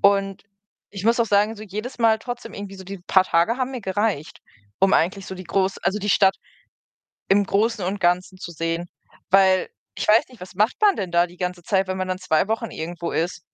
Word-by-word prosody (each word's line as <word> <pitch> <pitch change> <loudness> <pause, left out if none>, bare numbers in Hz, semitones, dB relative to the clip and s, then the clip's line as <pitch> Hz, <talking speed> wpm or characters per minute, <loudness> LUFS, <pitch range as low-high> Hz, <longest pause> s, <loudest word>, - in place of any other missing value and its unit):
und 195 -1 +2 0.5
ich 195 -1 -7
muss 230 +2 +3
auch 235 - +2
sagen, 210 +2 +2
so 215 - -9
jedes 215 +6 -6
Mal 225 -1 +4
trotzdem 245 +2 -7
irgendwie 200 -1 -7
so 190 - -10
die 195 +1 -7
paar 190 -1 +4
Tage 175 +7 +2
haben 260 0 -2
mir 250 - -5
gereicht, 195 -5 -2 0.4
um 195 0 +3
eigentlich 190 +3 +1
so 190 - -6
die 185 0 -9
groß 190 +3 0
also, 205 - -1
die 205 0 -1
Stadt 195 -1 +4 0.9
im 200 +1 +4
Großen 215 0 +1
und 195 +1 -3
Ganzen 180 +2 +1
zu 175 - -7
sehen. 165 +1 -3 0.4
Weil 190 -1 +4 0.3
ich - - -3
weiß 220 +2 +6
nicht, 250 -4 -17
was 180 +1 -10
macht 210 +5 +2
man 410 -3 +4
denn 185 -3 -4
da 175 0 +4
die 175 0 -17
ganze 180 -1 -4
Zeit, 190 +2 +1
wenn 185 - -3
man 185 0 -3
dann 185 - -2
2 185 0 +1
Wochen 225 0 -2
irgendwo 170 +1 -5
ist? 175 +2 -1
195 Hz, 220 wpm, -23 LUFS, 180-210 Hz, 0.9 s, weiß